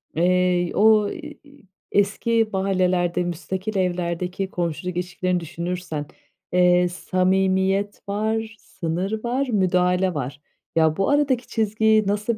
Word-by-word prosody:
eee, 180 0 +2
o, 215 -1 +5
eee, 305 -2 -8 0.5
eski 215 +3 +1
mahallelerde 185 -2 +1
müstakil 185 +4 -4
evlerdeki 180 +1 -2
komşuluk 175 0 -3
ilişkilerini 180 0 -1
düşünürsen, 170 -2 -4 0.5
eee, 180 0 +4
samimiyet 190 +2 0
var, 220 +2 -1
sınır 185 +6 -4
var, 255 +3 0
müdahale 180 -3 +2
var. 140 -1 -5 0.3
Ya, 160 -1 +3
bu 195 - +1
aradaki 280 -4 +1
çizgiyi 215 -1 +2
nasıl 210 +2 0
185 Hz, 105 wpm, -23 LUFS, 180-215 Hz, 0.5 s, o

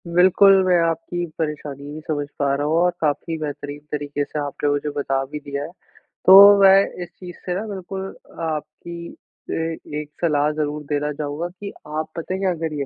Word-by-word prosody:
बिल्कुल, 190 +2 +6
मैं 180 -1 +4
आपकी 165 +2 -2
परेशानी 150 -3 -4
भी 155 - -6
समझ 145 -2 -1
पा 140 -1 +2
रहा 145 +1 -2
हूँ 155 - +1
और 180 +1 +3
काफ़ी 160 +2 -1
बेहतरीन 145 -1 -5
तरीके 145 -1 -2
से 150 - -5
आपने 145 0 -2
मुझे 145 +1 -1
बता 135 -1 0
भी 150 - -4
दिया 140 -1 -5
है। 160 - -7 0.5
तो 200 +2 +10
मैं 195 0 +7 0.2
इस 175 - -10
चीज़ 180 -2 -9
से 180 - -1
ना, 190 - -2
बिल्कुल 190 -1 -5 0.3
अ - - -5
आपकी 170 +2 -5 0.4
अ, - - -2 0.5
एक 150 -1 -7
सलाह 150 -3 +2
ज़रूर 150 0 -3
देना 150 0 0
चाहूँगा 150 +3 -4
कि 200 +3 -8 0.2
आप 155 +1 -3
पता 165 +2 -4
है 190 - -2
क्या 190 -2 +1
करिए? 155 -4 -3
155 Hz, 190 wpm, -22 LUFS, 145-180 Hz, 0.5 s, तो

